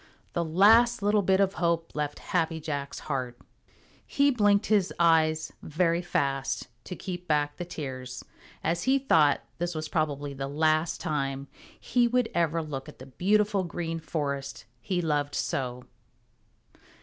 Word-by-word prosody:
The 170 - 0
last 210 +7 +5
little 205 0 +3
bit 190 0 +2
of 195 -1 +3
hope 170 -1 +1
left 150 -1 -3 0.2
Happy 165 -2 +1
Jack's 145 -3 -4
heart. 130 -4 -3 0.7
He 280 0 +2
blinked 205 -4 +3
his 205 -4 +2
eyes 160 -2 +3
very 170 +2 +1
fast 135 -5 -1 0.2
to 180 - -6
keep 180 -1 -6
back 145 -1 +1
the 175 - -4
tears, 130 -6 -6 0.4
as 170 +2 0
he 265 +1 +4
thought 160 - +3
that - - -32
this 175 0 -2
was 155 0 -4
probably 145 -3 -1
the 135 0 -4
last 155 +3 +1
time 140 -2 -2 0.3
he 245 -1 +2
would 245 -1 +1
ever 165 -1 +1
look 135 -3 -6
at - - -13
the 130 - -11
beautiful 200 +7 +1
Green 165 -1 -4
Forest 140 -5 -4 0.2
he 180 +3 -1
loved 145 -2 0
so. 125 -2 -2
160 Hz, 150 wpm, -28 LUFS, 145-185 Hz, 0.7 s, last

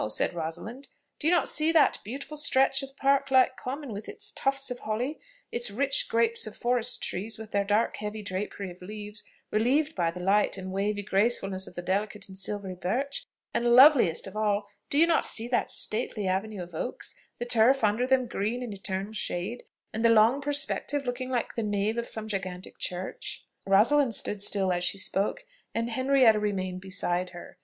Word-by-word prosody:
said 110 - +1
Rosalind. 175 - -6 0.3
"Do 305 - 0
you - - +5
not 350 - +3
see 310 +1 +3
that 330 - +4
beautiful 270 +7 -7
stretch 270 -2 +4
of 270 0 -10
park 275 0 +2
like 260 -1 +4
common, 265 -1 -6
with 205 +2 -7
its 415 -1 -6
tufts 275 -1 -1
of 245 - -5
holly, 240 +8 -3 0.3
its 240 -1 +2
rich 270 +6 +2
groups 230 0 +2
of 215 - -8
forest 245 0 +2
trees, 205 +5 -2
with 220 -1 -10
their 200 0 +1
dark 210 +3 +1
heavy 210 0 -5
drapery 195 0 -4
of 175 - -15
leaves, 210 +2 -8 0.3
relieved 275 +8 +2
by 170 - 0
the 175 +2 -7
light 195 +3 +2
and 190 0 -6
wavy 205 +2 -1
gracefulness 195 -2 +1
of - - -12
the 175 - -5
delicate 200 +2 -2
and 190 - -12
silvery 195 -1 -3
birch? 260 - -3 0.3
and, 240 0 +3
loveliest 255 - +6
of 195 - -9
all, 210 -1 0 0.2
do 280 - 0
you 325 - +7
not 335 -1 +2
see 230 +1 +1
that 245 0 0
stately 215 -2 -2
avenue 190 +1 -2
of 175 0 -13
oaks, 200 +10 -4 0.2
the 240 - -4
turf 240 +2 +4
under 215 +4 +2
them 260 -1 +3
green 235 +2 -2
in 230 -4 -5
eternal 195 +1 -4
shade, 210 +2 -3 0.3
and 220 - -2
the 230 - +6
long 230 +5 +5
perspective, 285 0 +1
looking 250 +1 -3
like 245 -2 -2
the 230 - -2
nave 210 +2 0
of 235 - -4
some 220 -1 -4
gigantic 185 -3 -5
church?" 180 +1 -4 0.2
Rosalind 230 +6 +4
stood 205 0 -3
still 195 -2 +1
as 175 0 -2
she 180 +2 +1
spoke, 195 +1 -2 0.3
and 230 +1 -1
Henrietta 260 -3 +4
remained 185 -3 -2
beside 185 -2 -2
her. 175 0 -12
220 Hz, 190 wpm, -28 LUFS, 195-255 Hz, 0.3 s, you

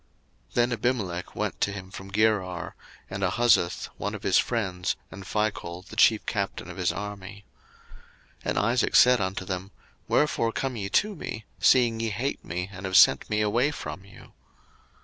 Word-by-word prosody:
01:026:026 - - -29
Then 120 0 +3
Abimelech 105 -7 -2
went - - -3
to 100 - +2
him 95 -2 -8
from 95 0 -9
Gerar, 100 -4 0 0.4
and 100 0 -4
Ahuzzath 95 -2 +2
one - - -3
of - - -9
his - - +4
friends, 95 -6 -1 0.2
and 100 -1 -9
Phichol 95 -4 -2
the 110 - -11
chief 110 -1 +4
captain 100 -1 -3
of - - -11
his 90 -1 +1
army. 100 0 -7 1.0
01:026:027 - - -3
And - - -1
Isaac 120 +4 +1
said 125 -2 +7
unto 95 0 -2
them, 95 0 -4 0.4
Wherefore 125 -6 +2
come 135 -2 -2
ye 100 -3 -4
to 210 - +1
me, 110 - -6
seeing 120 -3 +4
ye 115 0 -1
hate 125 +7 -3
me, 90 +2 -4
and 90 +1 -6
have 95 0 +3
sent - - +6
me 105 0 +1
away 120 +7 +2
from 120 -9 -7
you? 100 - -16
105 Hz, 175 wpm, -26 LUFS, 95-115 Hz, 1.0 s, said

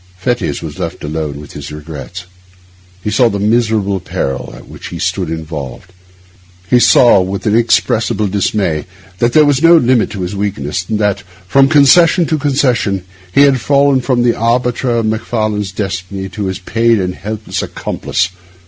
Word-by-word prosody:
Fettes 95 - -2
was - - -7
thus - - -3
left - - -16
alone 75 -1 -4
with 75 - -11
his 70 0 -8
regrets. 75 +3 -8 0.8
He 105 - -2
saw 120 +2 +3
the 100 - -3
miserable 105 -2 +1
peril 65 -7 -4
in - - -13
which - - -11
he - - -7
stood 90 -4 -2
involved. 80 0 -7 0.7
He 125 +5 +4
saw, 120 -4 +5
with 95 +1 -4
inexpressible 110 -1 +1
dismay, 95 -5 -1 0.3
that 120 +1 +1
there 155 -1 +6
was 145 -1 +2
no 165 +1 +7
limit 125 -5 +2
to 100 -3 -6
his 90 +3 -4
weakness, 95 -4 -3
and 110 - 0
that, 105 -2 0 0.3
from 135 +5 +4
concession 160 +4 +5
to 155 0 -1
concession, 125 -9 0 0.3
he 140 - +4
had 135 -3 +3
fallen 140 0 +3
from 125 -1 +1
the 120 -1 +3
arbiter 120 +2 0
of 115 -1 +1
Macfarlane's 110 -2 -2
destiny 95 -1 -4
to 105 +1 -5
his 95 -1 -3
paid 115 +3 +1
and 90 -1 -2
helpless 110 +3 -5
accomplice. 90 +2 -2
105 Hz, 165 wpm, -14 LUFS, 90-120 Hz, 0.8 s, no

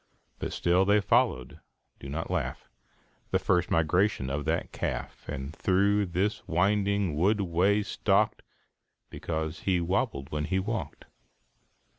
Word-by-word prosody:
But - - -3
still 90 +2 +2
they 100 +2 +4
followed 65 -9 +1 0.4
do 70 - -8
not 80 +5 -4
laugh 70 -8 -3 0.6
The - - +2
first 90 -1 +1
migrations 80 -3 +1
of 70 +1 -2
that - - -1
calf, - - -5
And 65 +3 -5
through 100 +2 +2
this 95 +5 -1
winding 100 0 +1
wood 100 +7 +2
way 95 +4 +2
stalked, - - +1 0.7
Because 80 -1 -4
he 95 -2 +1
wobbled 85 - -1
when 75 0 -2
he 95 - 0
walked. 95 -6 -4
90 Hz, 130 wpm, -28 LUFS, 75-100 Hz, 0.7 s, they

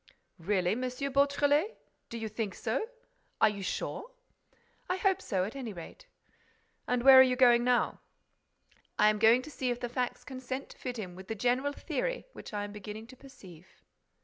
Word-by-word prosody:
"Really, 180 0 +1
M. 235 - -1
Beautrelet—do 280 - 0
you 225 -1 -4
think 215 -2 -4
so? 445 - -2 0.5
Are - - +6
you 205 -1 -6
sure?" 435 - -4 0.8
"I 365 - 0
hope 385 -1 +1
so, 190 -5 -1
at 215 +7 -5
any 245 -6 -5
rate." 175 - -11 0.8
"And 245 -1 0
where 265 0 +10
are - - +12
you 255 -1 +4
going 240 -2 +5
now?" 245 0 +1 1.0
"I 210 - +6
am 210 - -4
going 230 +3 +5
to 305 - -10
see 260 -3 -2
if 245 0 -2
the 245 - -4
facts 250 0 -3
consent 260 0 -6
to - - -14
fit 250 -2 -5
in 185 -5 -6
with 190 +1 -11
the 225 - -3
general 250 +6 +1
theory - - -3
which - - -10
I 205 -1 -3
am 205 - -6
beginning 210 +1 -8
to - - -13
perceive." 185 - -15
245 Hz, 180 wpm, -30 LUFS, 210-270 Hz, 1.0 s, are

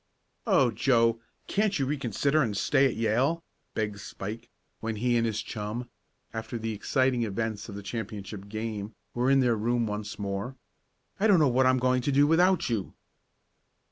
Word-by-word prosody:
"Oh, 125 -3 +4
Joe, 115 -1 +3 0.3
can't 205 0 +1
you 135 - +1
reconsider, 140 +2 +1
and 105 -7 0
stay 135 +5 +3
at - - -3
Yale?" 125 +10 +1 0.3
begged 105 -2 -2
Spike, 105 +4 -7 0.3
when 115 0 -3
he 120 +3 +1
and 115 -1 +2
his 110 -2 -2
chum, 115 +3 -5 0.4
after 110 +2 -4
the 115 0 -3
exciting 130 +4 +1
events 110 0 -2
of 100 - -7
the 100 - -7
championship 100 -2 -6
game, 110 -1 -4 0.2
were 125 +2 +1
in 135 0 +5
their 120 -2 +3
room 120 +2 +1
once 105 -1 -4
more. 100 +5 -3 0.6
"I 215 - +4
don't 200 -4 +6
know 155 -3 +5
what 130 +1 +3
I'm 130 0 +4
going 130 0 +2
to 140 - 0
do 140 +1 +5
without 175 +3 +4
you." 110 -6 -2
115 Hz, 170 wpm, -28 LUFS, 105-130 Hz, 0.6 s, don't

